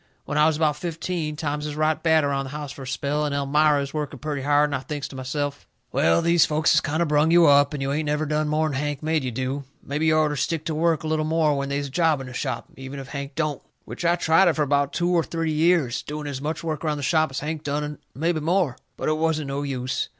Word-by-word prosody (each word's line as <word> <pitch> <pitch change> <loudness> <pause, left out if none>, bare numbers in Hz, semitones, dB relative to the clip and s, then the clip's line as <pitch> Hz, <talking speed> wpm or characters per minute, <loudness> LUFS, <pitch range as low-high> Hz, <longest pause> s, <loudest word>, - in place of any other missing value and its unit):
When 145 - -4
I 150 +1 +5
was 160 -2 +1
about 155 -2 +1
fifteen, 165 -1 -3
times 150 -1 -3
is 150 - -5
right 155 0 +1
bad 160 -2 +4
around 140 -1 0
the - - -7
house 145 -1 -6
fur 135 - -10
a 130 - -7
spell, 140 +3 -1
and 145 -1 -1
Elmira 145 +1 +3
is 140 - -7
working 150 -2 -3
purty 150 0 -4
hard, 145 +2 +3
and - - 0
I - - -1
thinks 145 +1 -5
to - - -10
myself: 145 +2 -4 0.2
"Well, 85 +1 +3
these 170 -1 +5
folks 155 +1 +2
has - - +5
kind 155 +3 0
o' - - 0
brung 150 0 +3
you 170 0 +6
up, 145 -1 +5
and 145 -3 -3
you 135 - -1
ain't 150 +1 -1
never 150 +1 0
done 150 0 0
more'n 155 0 0
Hank 145 +1 -2
made 155 -2 +1
you 130 - -1
do. 130 +3 -3 0.2
Mebby 150 +3 -1
you 155 0 +4
orter 155 -1 +2
stick 160 +2 -2
to 160 - -2
work 160 0 +1
a - - -3
little 155 0 0
more 155 -1 +2
when 140 0 -2
they's 140 0 -1
a 140 - -8
job 160 -1 +2
in 135 - -6
the 130 - -9
shop, 130 +1 -3
even 135 +1 -7
if 135 -1 -9
Hank 140 -1 -6
don't." 150 -3 -1 0.2
Which - - -7
I 170 0 +4
tried 170 +2 +4
it 170 - +4
fur 155 - +1
about 140 0 +1
two 175 0 0
or 175 -2 +4
three 165 0 -2
years, 155 -5 +2
doing 150 0 -6
as 140 -2 -4
much 155 +3 -3
work 155 -2 -3
around 150 -2 0
the 145 - -5
shop 155 +1 +2
as 135 - -4
Hank 155 +1 -3
done 145 0 -1
and 150 -1 -5 0.2
mebby 165 +3 0
more. 165 -3 +1 0.2
But - - -3
it 155 0 +1
wasn't 155 -3 0
no 140 +1 -2
use. 130 -2 -2
150 Hz, 275 wpm, -24 LUFS, 140-155 Hz, 0.2 s, you